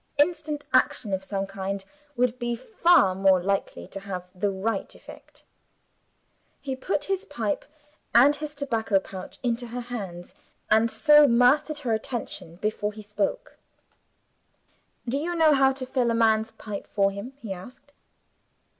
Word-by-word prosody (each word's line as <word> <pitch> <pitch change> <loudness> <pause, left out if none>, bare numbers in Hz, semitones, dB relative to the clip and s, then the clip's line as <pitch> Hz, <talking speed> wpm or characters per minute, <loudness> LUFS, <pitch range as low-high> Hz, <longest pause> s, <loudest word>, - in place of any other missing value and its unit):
Instant 300 -1 +1
action, 255 -5 +2
of 190 0 -1
some 195 0 -3
kind, 195 0 -5 0.3
would 250 0 +1
be 240 -1 -1
far 335 - +3
more 190 0 +4
likely 195 +2 -2
to 195 - -7
have 190 -2 -6
the 195 +2 -1
right 195 +2 -3
effect. - - -14 1.2
He 270 -2 -4
put 265 +9 -2
his 390 0 -2
pipe 220 - -3 0.5
and 270 +5 +6
his 300 0 -6
tobacco 225 -7 0
pouch 190 -1 -9
into 240 0 -1
her 240 +2 -5
hands, 195 -8 -7 0.4
and 220 +2 +5
so 295 +3 +6
mastered 270 +6 +3
her 240 -5 -1
attention 220 -7 -3
before 210 +2 -2
he 215 0 -10
spoke. 210 - -3 1.5
"Do 265 +4 0
you 345 +3 -2
know 320 -2 +5
how 270 -1 +4
to 260 -1 -6
fill 255 -2 0
a 230 - +1
man's 220 -1 +3
pipe 210 -2 -7
for 200 -1 +1
him?" 200 +7 -7
he 225 -8 -6
asked. 245 +9 -13
230 Hz, 150 wpm, -26 LUFS, 200-280 Hz, 1.5 s, and